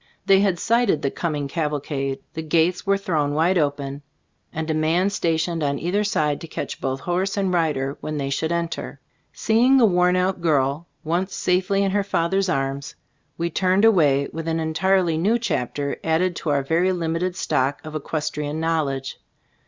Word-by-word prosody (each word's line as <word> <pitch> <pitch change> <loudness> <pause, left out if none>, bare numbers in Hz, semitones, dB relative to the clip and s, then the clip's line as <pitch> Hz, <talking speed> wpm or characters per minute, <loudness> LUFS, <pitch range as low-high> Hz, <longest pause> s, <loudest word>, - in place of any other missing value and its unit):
They 195 0 +5
had 195 -3 +2
sighted 230 -2 +1
the 140 - 0
coming 150 -4 -2
cavalcade. 140 -3 -2
The 160 - -4
gates 165 +4 +1
were 200 0 +3
thrown 150 -7 -1
wide 170 +4 +3
open, 140 -1 -2 0.5
and 160 0 -4
a 160 - 0
man 165 +5 +1
stationed 165 -3 -1
on 140 -1 0
either 185 +7 0
side 150 -8 0
to 165 - -7
catch - - -6
both 135 0 -2
horse 185 +3 -1
and 190 -2 0
rider 150 -5 0
when 155 0 -4
they 140 -1 -2
should 160 +4 -1
enter. 170 -1 -3 0.3
Seeing 240 +5 +3
the 245 - +6
worn 180 -2 +3
out 185 0 0
girl 150 0 +1 0.2
once 175 +5 -1
safely 185 +2 +1
in 195 - +1
her 200 +1 +1
father's 190 0 0
arms, 135 -2 -2 0.4
we 170 0 -2
turned 185 +5 +2
away, 145 -10 +4
with 165 0 -5
an 165 0 0
entirely 165 +1 +1
new 210 +7 +2
chapter 140 - -2
added 170 +2 +1
to 160 - -3
our 140 -1 +1
very 170 +6 +2
limited 175 +1 -1
stock 140 -6 0
of 155 - -7
equestrian 150 0 -3
knowledge. 145 -5 -1
165 Hz, 175 wpm, -23 LUFS, 145-185 Hz, 0.5 s, the